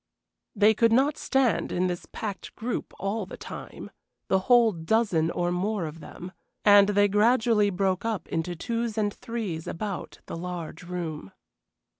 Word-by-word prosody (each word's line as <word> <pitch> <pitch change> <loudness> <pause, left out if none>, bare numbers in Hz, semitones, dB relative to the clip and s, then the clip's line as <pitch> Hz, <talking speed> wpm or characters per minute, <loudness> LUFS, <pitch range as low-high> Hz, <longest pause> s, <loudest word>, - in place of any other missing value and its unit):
They 210 +2 +5
could 230 +1 +3
not 275 +5 +3
stand 245 - +1
in 180 +1 +1
this 175 -1 -3
packed 205 -3 -6
group 240 +1 -4
all 200 0 -2
the - - -9
time, - - -9 0.4
the 190 - +4
whole 240 -2 +6
dozen 170 -1 +1
or 175 0 -1
more 190 +1 -1
of 155 +1 -7
them, 180 +2 -9 0.3
and 205 -1 +7
they 205 0 +4
gradually 215 0 +3
broke 190 -1 0
up 220 -7 -2
into 165 +2 -2
twos 230 +4 -3
and 205 -1 +1
threes 215 -9 -5
about 200 +1 -5
the - - -6
large 170 -2 -6
room. 170 - -5
200 Hz, 155 wpm, -27 LUFS, 175-225 Hz, 0.4 s, and